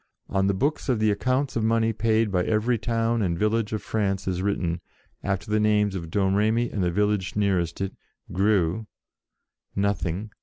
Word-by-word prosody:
On 95 Hz, 0 st, +1 dB
the 100 Hz, -, +1 dB
books 145 Hz, +7 st, -1 dB
of 125 Hz, -, +3 dB
the 110 Hz, 0 st, +2 dB
accounts 130 Hz, +6 st, 0 dB
of 115 Hz, -, 0 dB
money 115 Hz, 0 st, +2 dB
paid 110 Hz, 0 st, +1 dB
by 90 Hz, -2 st, +2 dB
every 110 Hz, +3 st, +1 dB
town 115 Hz, +1 st, 0 dB
and 85 Hz, -4 st, 0 dB
village 110 Hz, +2 st, +1 dB
of 105 Hz, -2 st, -3 dB
France 100 Hz, -4 st, -1 dB
is 90 Hz, -1 st, -1 dB
written, 90 Hz, -4 st, -1 dB, 0.4 s
after 100 Hz, +1 st, -2 dB
the 110 Hz, -, +3 dB
names 105 Hz, -1 st, +2 dB
of 85 Hz, -4 st, -5 dB
Domremy 105 Hz, +5 st, +1 dB
and 100 Hz, -, -2 dB
the 90 Hz, -, +2 dB
village 105 Hz, 0 st, 0 dB
nearest 95 Hz, -4 st, 0 dB
it, 95 Hz, 0 st, -2 dB, 0.4 s
Greux, 95 Hz, +1 st, +1 dB, 0.9 s
Nothing. 100 Hz, 0 st, -1 dB
105 Hz, 175 wpm, -25 LUFS, 95-110 Hz, 0.9 s, of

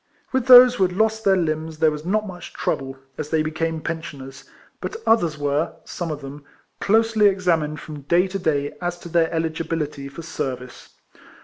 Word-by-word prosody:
With 260 Hz, -1 st, 0 dB
those 250 Hz, -1 st, +10 dB
who 240 Hz, -, +1 dB
had 180 Hz, -1 st, +1 dB
lost 220 Hz, +1 st, +1 dB
their 195 Hz, -2 st, +4 dB
limbs, 160 Hz, -2 st, -2 dB
there 160 Hz, 0 st, +3 dB
was 150 Hz, 0 st, -6 dB
not 210 Hz, +5 st, 0 dB
much 175 Hz, -3 st, -9 dB
trouble, 135 Hz, 0 st, -3 dB, 0.2 s
as 150 Hz, -, -4 dB
they 155 Hz, -1 st, +1 dB
became 160 Hz, +1 st, -2 dB
pensioners; 140 Hz, -5 st, -7 dB, 0.4 s
but -, -, -4 dB
others 170 Hz, -9 st, +3 dB
were, 145 Hz, +2 st, -1 dB
some 175 Hz, -2 st, -5 dB
of 150 Hz, -1 st, -4 dB
them, 140 Hz, +1 st, -9 dB, 0.4 s
closely 220 Hz, 0 st, +4 dB
ex 190 Hz, -1 st, -4 dB
amined 155 Hz, -3 st, +1 dB
from 150 Hz, -1 st, -9 dB
day 170 Hz, +7 st, +2 dB
to 195 Hz, +1 st, -4 dB
day 145 Hz, -4 st, 0 dB
as 175 Hz, 0 st, -2 dB
to 170 Hz, -, -9 dB
their 165 Hz, -1 st, +2 dB
eligibility 160 Hz, -3 st, -3 dB
for 165 Hz, +4 st, -9 dB
service. 125 Hz, -6 st, -6 dB
165 Hz, 185 wpm, -22 LUFS, 150-185 Hz, 0.4 s, those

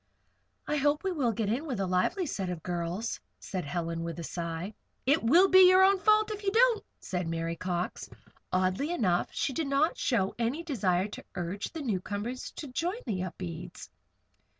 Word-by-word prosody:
"I 300 Hz, -, 0 dB
hope 290 Hz, +3 st, +2 dB
we 385 Hz, -, 0 dB
will 275 Hz, -9 st, +1 dB
get 220 Hz, -1 st, -2 dB
in 265 Hz, +9 st, -1 dB
with 250 Hz, -8 st, -3 dB
a 195 Hz, -, +1 dB
lively 185 Hz, -, +1 dB
set 195 Hz, -, -3 dB
of 175 Hz, -3 st, -5 dB
girls," 180 Hz, +5 st, -3 dB, 0.2 s
said 185 Hz, -4 st, -4 dB
Helen, 165 Hz, +1 st, -3 dB
with 170 Hz, -1 st, -5 dB
a -, -, -4 dB
sigh. 170 Hz, +4 st, -4 dB, 0.3 s
"It 285 Hz, +5 st, +4 dB
will 335 Hz, +12 st, +6 dB
be 375 Hz, -1 st, +8 dB
your 370 Hz, +1 st, +7 dB
own 390 Hz, 0 st, +5 dB
fault 430 Hz, +2 st, +4 dB
if 415 Hz, -1 st, -5 dB
you 390 Hz, -, +1 dB
don't," 465 Hz, +1 st, +4 dB, 0.2 s
said 180 Hz, -2 st, -3 dB
Mary 165 Hz, 0 st, -2 dB
Cox. 175 Hz, 0 st, -3 dB, 0.4 s
Oddly 185 Hz, -, +1 dB
enough, 185 Hz, -, +1 dB
she 270 Hz, -, -1 dB
did 315 Hz, +2 st, -1 dB
not 280 Hz, +4 st, +2 dB
show 195 Hz, -7 st, +1 dB
any 245 Hz, +8 st, -1 dB
desire 195 Hz, -, +1 dB
to -, -, -8 dB
urge 180 Hz, +4 st, -3 dB
the 320 Hz, -2 st, -5 dB
newcomers 210 Hz, +2 st, -3 dB
to 300 Hz, -, -6 dB
join 345 Hz, -, -2 dB
the 200 Hz, -7 st, -2 dB
Upedes. 175 Hz, -1 st, -7 dB
220 Hz, 185 wpm, -30 LUFS, -, 0.4 s, be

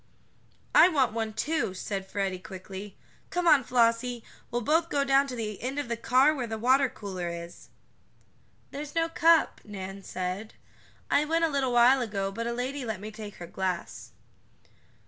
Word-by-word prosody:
"I -, -, +8 dB
want 275 Hz, -9 st, +2 dB
one, 225 Hz, -1 st, -2 dB
too," 225 Hz, -4 st, -1 dB
said 195 Hz, 0 st, -4 dB
Freddie 195 Hz, -2 st, -2 dB
quicky. 190 Hz, +1 st, -9 dB, 0.3 s
"Come 355 Hz, 0 st, -1 dB
on, 295 Hz, -5 st, +6 dB
Flossie, 235 Hz, 0 st, +1 dB, 0.3 s
we'll 240 Hz, 0 st, -2 dB
both 325 Hz, +6 st, +2 dB
go 280 Hz, -, +1 dB
down 275 Hz, 0 st, +3 dB
to 255 Hz, -, -5 dB
the 215 Hz, -3 st, -5 dB
end 260 Hz, +3 st, -3 dB
of 290 Hz, -5 st, -3 dB
the 235 Hz, -, 0 dB
car 255 Hz, +6 st, +4 dB
where 255 Hz, -5 st, -3 dB
the 220 Hz, 0 st, -4 dB
water 260 Hz, +4 st, +3 dB
cooler 185 Hz, -6 st, -5 dB
is." 170 Hz, 0 st, -8 dB, 1.0 s
"There's 290 Hz, +2 st, -7 dB
no 330 Hz, 0 st, +1 dB
cup," 330 Hz, 0 st, +3 dB
Nan 195 Hz, -1 st, -7 dB
said. 185 Hz, +3 st, -5 dB, 0.6 s
"I 285 Hz, -, +4 dB
went 330 Hz, +2 st, +2 dB
a -, -, 0 dB
little 275 Hz, -3 st, 0 dB
while 245 Hz, +2 st, +6 dB
ago, 200 Hz, -4 st, -2 dB
but 230 Hz, +4 st, -4 dB
a -, -, -1 dB
lady 255 Hz, +3 st, -3 dB
let 220 Hz, -5 st, -4 dB
me 215 Hz, +2 st, -7 dB
take 215 Hz, -2 st, -9 dB
her 175 Hz, -, -8 dB
glass." 185 Hz, 0 st, -4 dB
235 Hz, 175 wpm, -28 LUFS, 195-275 Hz, 1.0 s, I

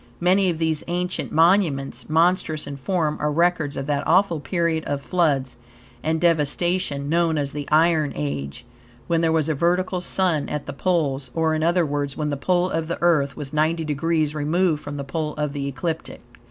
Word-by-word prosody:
Many 185 Hz, +2 st, +3 dB
of 170 Hz, -, -1 dB
these 160 Hz, -2 st, 0 dB
ancient 180 Hz, +1 st, -2 dB
monuments, 160 Hz, -6 st, +2 dB
monstrous 160 Hz, -1 st, +1 dB
in 140 Hz, -, -6 dB
form, 155 Hz, +1 st, -1 dB
are 150 Hz, -, 0 dB
records 165 Hz, -2 st, +1 dB
of 135 Hz, -, -3 dB
that 145 Hz, -1 st, 0 dB
awful 175 Hz, -1 st, +3 dB
period 160 Hz, +2 st, -1 dB
of 145 Hz, -1 st, -2 dB
floods 140 Hz, -6 st, 0 dB, 0.4 s
and 160 Hz, +1 st, 0 dB
devastation 165 Hz, -2 st, +1 dB
known 165 Hz, 0 st, +1 dB
as 140 Hz, -1 st, -1 dB
the 145 Hz, -1 st, -5 dB
Iron 155 Hz, -1 st, +3 dB
Age, 70 Hz, -, -4 dB, 0.4 s
when 165 Hz, -1 st, +1 dB
there 165 Hz, -1 st, +2 dB
was 160 Hz, -2 st, +1 dB
a 160 Hz, -, +1 dB
vertical 180 Hz, +4 st, 0 dB
Sun 180 Hz, -5 st, 0 dB
at 150 Hz, -, -4 dB
the -, -, -6 dB
poles; 140 Hz, -5 st, 0 dB
or, 160 Hz, -1 st, +1 dB
in 155 Hz, -, -1 dB
other 170 Hz, +1 st, +2 dB
words, 145 Hz, -1 st, -3 dB
when 150 Hz, -1 st, -1 dB
the -, -, -1 dB
pole 180 Hz, +5 st, +1 dB
of 165 Hz, -1 st, -2 dB
the 170 Hz, -, -3 dB
Earth 150 Hz, -5 st, +2 dB
was 145 Hz, -1 st, -6 dB
ninety 160 Hz, +2 st, +1 dB
degrees 155 Hz, +1 st, 0 dB
removed 155 Hz, +1 st, +1 dB
from 145 Hz, 0 st, -6 dB
the 140 Hz, -, -4 dB
pole 150 Hz, +2 st, -3 dB
of 150 Hz, -1 st, -2 dB
the 140 Hz, -1 st, -3 dB
ecliptic. 160 Hz, +4 st, -4 dB
155 Hz, 190 wpm, -23 LUFS, 145-170 Hz, 0.4 s, Many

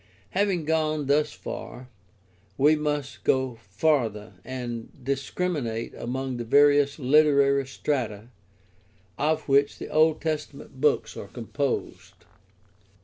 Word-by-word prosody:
Having 190 Hz, -4 st, 0 dB
gone 155 Hz, -1 st, 0 dB
thus 145 Hz, +2 st, +2 dB
far, 125 Hz, +1 st, -8 dB, 0.7 s
we 150 Hz, +3 st, +5 dB
must 150 Hz, -2 st, -3 dB
go 130 Hz, -1 st, +1 dB
farther 110 Hz, -1 st, 0 dB
and 120 Hz, -2 st, -5 dB
discriminate 135 Hz, -3 st, -2 dB
among 130 Hz, +1 st, -4 dB
the 120 Hz, -, -3 dB
various 145 Hz, +3 st, +4 dB
literary 140 Hz, -1 st, +4 dB
strata 120 Hz, -6 st, -3 dB, 0.9 s
of 155 Hz, +2 st, 0 dB
which 140 Hz, 0 st, +3 dB
the -, -, -7 dB
Old 155 Hz, 0 st, +3 dB
Testament 150 Hz, -4 st, -5 dB
books 150 Hz, -1 st, +2 dB
are -, -, -7 dB
composed. 130 Hz, +3 st, -4 dB
140 Hz, 105 wpm, -26 LUFS, 125-150 Hz, 0.9 s, we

